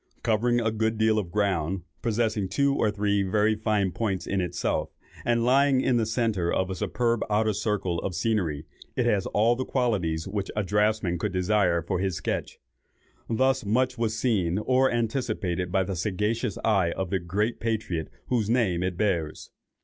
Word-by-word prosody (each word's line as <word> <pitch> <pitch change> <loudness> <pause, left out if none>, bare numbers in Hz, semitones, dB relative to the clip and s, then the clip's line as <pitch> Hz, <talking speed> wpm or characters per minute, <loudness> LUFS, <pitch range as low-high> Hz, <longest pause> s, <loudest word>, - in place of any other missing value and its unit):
Covering 120 +2 +2
a 110 -1 0
good 110 0 0
deal 110 0 +3
of 95 -5 -4
ground, 95 -3 0 0.2
possessing 110 -4 0
two 140 +7 +2
or 110 - +2
three 100 0 +1
very 105 +3 +2
fine 105 -3 0
points 100 -2 -2
in 95 -1 -1
itself, 90 - -1 0.3
and 120 -1 +1
lying 135 +1 +4
in 130 -1 +2
the 110 -2 +1
centre 110 -7 0
of 95 0 0
a - - -3
superb 115 +4 0
outer 110 +1 +2
circle 100 -4 -1
of 90 - -4
scenery, 85 -9 -1 0.3
it - - +1
has 100 -3 +1
all 115 +3 +3
the 130 - -2
qualities 95 -13 -1
which 100 0 -3
a 105 - 0
draftsman 105 -2 +1
could 105 +2 -1
desire 90 -2 +2
for 85 - -2
his 95 -2 -1
sketch. - - -3 0.7
Thus 130 +3 +2
much 125 +5 +1
was 110 -1 0
seen 100 -8 +1
or 130 +4 +3
anticipated 110 -7 -1
by 95 0 +2
the 95 +1 -4
sagacious 105 +4 -1
eye 95 -6 +2
of 95 -2 -4
the 95 - +1
great 100 +7 -1
patriot 110 -8 -2 0.2
whose 115 -4 0
name 110 -8 +2
it 90 -1 -2
bears. 85 -7 -1
105 Hz, 175 wpm, -26 LUFS, 95-115 Hz, 0.7 s, lying